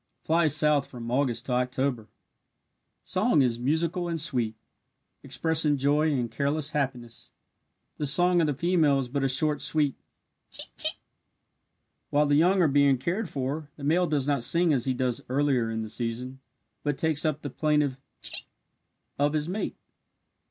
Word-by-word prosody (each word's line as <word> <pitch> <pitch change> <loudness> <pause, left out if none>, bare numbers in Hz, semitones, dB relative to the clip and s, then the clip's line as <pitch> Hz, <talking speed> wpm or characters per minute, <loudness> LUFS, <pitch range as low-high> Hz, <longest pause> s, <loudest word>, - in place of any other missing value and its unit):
Flies 160 -2 +3
south 150 -2 +4
from 120 -2 -8
August 125 -2 0
to - - -5
October. 125 -2 -1 1.0
Song 145 - +2
is 120 -2 0
most 120 - -6
musical 165 +4 0
and 165 -1 -2
sweet, 115 -6 +1 0.7
expressing 150 +2 +1
joy 145 +3 +2
and 125 -5 -2
careless 145 +1 -1
happiness 125 -5 -4 0.7
the 150 - 0
song 175 +5 +4
of 160 - +1
the 145 - -1
female 160 -2 +2
is 135 -2 -2
but 140 +1 -2
a - - +3
short, 150 +3 +1
sweet 150 -3 +1 0.6
"Chink, - - -3
chink." - - +2 1.1
While 145 +1 +2
the 145 - +1
young 180 +5 +4
are - - +4
being 140 -1 +3
cared 175 - -3
for, 145 +3 -4
the 145 - -11
male 170 +5 +2
does 145 -3 -1
not 140 -3 +1
sing 170 +5 +3
as 125 -4 0
he 130 -1 0
does 125 -1 -1
earlier 130 -3 +1
in 110 0 -3
the - - -6
season, 120 +3 -4 0.4
but 145 -2 -2
takes 160 -2 +1
up 155 -2 -2
the 145 - -5
plaintive 150 -3 0 0.2
"chink" - - +2 0.7
of 145 +1 +2
his 155 0 -1
mate. 195 +5 -3
145 Hz, 165 wpm, -26 LUFS, 130-155 Hz, 1.1 s, south